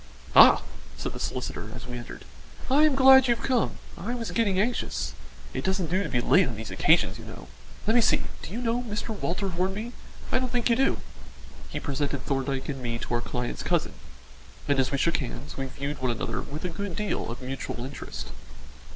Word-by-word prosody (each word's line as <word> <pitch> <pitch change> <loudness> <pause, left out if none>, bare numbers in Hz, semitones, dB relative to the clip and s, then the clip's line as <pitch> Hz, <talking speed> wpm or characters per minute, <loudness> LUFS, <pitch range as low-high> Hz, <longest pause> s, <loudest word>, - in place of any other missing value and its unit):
"Ah!" - - +9 0.3
said - - -4
the - - -7
solicitor, - - -4
as - - -8
we 125 - -6
entered, 120 -1 -8 0.5
"I 295 +3 +6
am 300 -3 +4
glad 265 -1 +8
you've 235 -1 +1
come; 255 -3 +2 0.2
I 235 +7 -3
was 230 -2 -4
getting 200 -5 +2
anxious 235 +5 -1 0.4
it - - -3
doesn't 190 -3 0
do 185 +2 +2
to 190 - -3
be 125 - +1
late 185 +6 +5
on 120 - -4
these 110 +1 -6
occasions, - - +3
you - - -10
know. - - -10 0.4
Let 220 - +3
me 240 - +6
see, - - +3 0.2
do - - -8
you 235 +5 -4
know 235 +1 +1
Mr. 215 -2 -4
Walter 195 -2 -2
Hornby? 190 +6 -2 0.4
I - - +3
don't 255 -1 -2
think 245 -1 +1
you - - +5
do." 270 +3 +2 0.7
He - - -3
presented 140 -1 -2
Thorndyke 135 -1 -1
and 135 -3 -4
me 120 -1 -2
to 120 - -5
our 120 - +2
client's 125 0 -3
cousin, - - 0 0.7
and 140 -1 +3
as 130 -1 +3
we 140 - +1
shook 170 +5 +2
hands, 140 +1 -6
we 135 -1 -3
viewed 140 +2 -5
one 130 - +1
another 115 - -2
with 150 +5 -6
a - - 0
good 185 +1 -4
deal 210 - -2
of 120 - -5
mutual 130 -2 -5
interest. 135 +1 -7
180 Hz, 210 wpm, -27 LUFS, -, 0.7 s, Ah